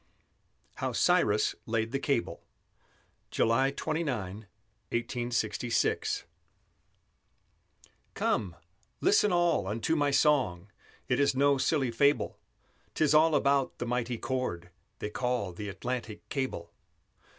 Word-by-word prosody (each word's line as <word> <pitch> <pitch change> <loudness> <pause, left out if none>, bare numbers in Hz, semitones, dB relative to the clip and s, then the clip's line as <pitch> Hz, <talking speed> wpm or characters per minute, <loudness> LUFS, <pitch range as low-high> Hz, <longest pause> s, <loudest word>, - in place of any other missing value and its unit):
HOW - - -2
CYRUS - - +3
LAID 110 0 -1
THE 135 - -1
CABLE 135 -4 -1 0.9
[July 130 +4 +2
29, 125 - -3 0.4
1866] 120 0 -1 1.9
Come, 90 -5 0 0.4
listen 210 0 +4
all 175 - +2
unto 115 +10 0
my 145 -2 +2
song; 125 - +2 0.4
It - - +1
is 140 -1 +3
no 140 0 +3
silly 135 -4 +1
fable; 125 -2 +1 0.6
'Tis 155 -1 +3
all 155 0 +5
about 140 -1 +2
the - - -3
mighty 120 0 -1
cord 110 -10 -3 0.3
They 105 - -5
call 125 -6 -1
the 105 +4 -6
Atlantic 120 +1 -5
Cable. 130 - -3
125 Hz, 105 wpm, -29 LUFS, 110-140 Hz, 1.9 s, all